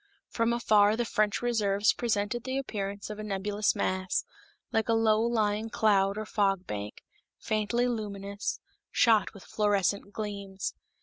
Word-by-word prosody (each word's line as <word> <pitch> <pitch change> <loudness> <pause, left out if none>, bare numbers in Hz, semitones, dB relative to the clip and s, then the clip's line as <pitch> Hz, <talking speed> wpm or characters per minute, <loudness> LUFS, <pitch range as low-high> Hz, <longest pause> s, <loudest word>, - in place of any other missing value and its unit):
From 230 0 +1
afar 215 -3 +4
the 240 - 0
French 210 -1 0
reserves 210 -3 +2
presented 225 0 -1
the 260 +1 -2
appearance 200 -6 -4
of 210 - -7
a - - -4
nebulous 205 +1 0
mass, 185 0 -1 0.5
like 225 0 0
a - - +4
low 220 -1 +3
lying 220 -2 0
cloud 200 -2 +2
or 215 - -3
fog 195 -3 +1
bank, 105 -4 -6 0.3
faintly 220 +3 0
luminous, 200 -3 -3 0.3
shot 225 -3 +3
with 200 - -12
fluorescent 200 -1 0
gleams. 200 -3 -4
210 Hz, 140 wpm, -29 LUFS, 200-225 Hz, 0.5 s, afar